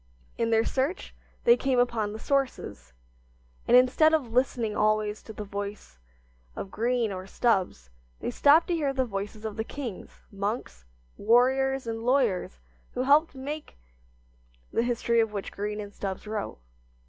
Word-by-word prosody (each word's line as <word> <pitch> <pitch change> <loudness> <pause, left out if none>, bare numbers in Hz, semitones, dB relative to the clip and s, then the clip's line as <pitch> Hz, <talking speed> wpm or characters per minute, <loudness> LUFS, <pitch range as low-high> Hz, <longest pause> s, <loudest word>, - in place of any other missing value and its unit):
In 230 -1 0
their 225 0 +3
search 275 +8 -2 0.3
they 475 0 +7
came 265 - 0
upon 235 -4 +1
the 215 - -6
sources, 275 - -2 0.7
and 245 - +7
instead 295 +5 +5
of 250 -8 -3
listening 240 -4 +1
always 215 0 +1
to - - -10
the 210 - -6
voice 200 - -7 0.6
of 190 - -6
Green 235 -1 0
or 185 0 -6
Stubbs, 185 - 0 0.3
they - - -3
stopped 295 - +5
to - - +2
hear 295 -5 0
the 260 -1 +1
voices 210 0 -5
of 215 -1 -5
the 220 - -1
kings, 240 -5 -8
monks, 200 - -4 0.3
warriors 265 +4 +3
and 225 0 -4
lawyers 240 - +1 0.4
who 250 - -1
helped 295 +4 +4
to - - -14
make 295 +3 -6 1.0
the - - +2
history 235 -1 +1
of 225 -2 +1
which 200 -2 -4
Green 210 +1 -4
and 205 -1 -7
Stubbs 195 0 -5
wrote. 210 -1 -4
230 Hz, 160 wpm, -27 LUFS, 205-265 Hz, 1.0 s, they